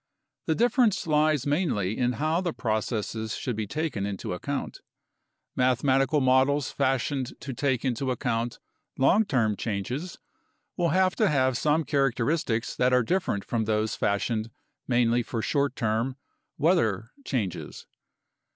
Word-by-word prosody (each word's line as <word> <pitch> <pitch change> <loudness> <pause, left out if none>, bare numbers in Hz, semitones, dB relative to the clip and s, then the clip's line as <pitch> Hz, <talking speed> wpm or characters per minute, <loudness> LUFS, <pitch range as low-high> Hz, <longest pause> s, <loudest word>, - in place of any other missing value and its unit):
The 160 - +2
difference 235 - +2
lies 150 -3 +2
mainly 145 - 0
in 125 0 +1
how 155 +6 0
the 175 -3 -2
processes 110 0 -2
should 125 - -3
be 110 -1 -3
taken 150 -6 -2
into 100 -2 -3
account. 140 +10 -4 0.7
Mathematical 135 +3 +2
models 130 +2 +3
fashioned 135 0 -1
to 135 0 -6
take 130 0 0
into 130 +1 -1
account 120 -2 -1 0.4
long 195 +11 +4
term 115 - +1
changes 120 - -4 0.6
will 175 -2 +1
have 185 +3 +2
to 215 -3 +3
have 130 -3 +2
some 155 +5 +2
characteristics 135 -3 0
that 125 0 +2
are 125 -1 +4
different 115 - -1
from 115 -2 -1
those 110 0 0
fashioned 110 +2 -1 0.4
mainly 120 -1 +3
for 115 0 -4
short 140 -2 0
term 115 +2 -1 0.4
(weather) 125 - +1
changes. 110 - -4
130 Hz, 135 wpm, -27 LUFS, 115-150 Hz, 0.7 s, long